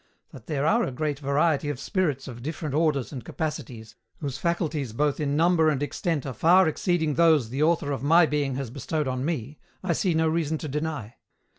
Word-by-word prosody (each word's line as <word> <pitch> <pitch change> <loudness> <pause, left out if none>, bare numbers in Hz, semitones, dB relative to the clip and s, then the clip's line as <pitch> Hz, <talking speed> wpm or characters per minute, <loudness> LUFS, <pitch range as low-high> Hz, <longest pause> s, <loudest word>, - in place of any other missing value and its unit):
That 125 -3 -13
there 145 -2 -1
are 160 - +3
a - - -2
great 145 +2 -2
variety 145 +1 +1
of 145 - -4
spirits 150 - -1
of 120 -2 -8
different 155 +1 -4
orders 150 -4 +1
and 130 -4 -6
capacities, 120 -7 -5 0.2
whose 140 -3 -5
faculties 155 -7 -1
both 145 +3 0
in 145 -2 0
number 165 -1 +4
and 145 -2 0
extent 150 0 -2
are 135 - -4
far 180 +6 +5
exceeding 160 -1 0
those 160 -7 +4
the 135 +4 -3
Author 155 -2 +2
of 135 - -3
my 165 +5 +5
being 145 -3 -1
has 135 -3 -4
bestowed 145 +3 -2
on 130 0 -2
me, 145 -3 -3 0.2
I 190 - +1
see 180 -4 0
no 160 0 +2
reason 160 -1 0
to 155 - -6
deny. 150 -6 -4
150 Hz, 200 wpm, -26 LUFS, 135-160 Hz, 0.2 s, far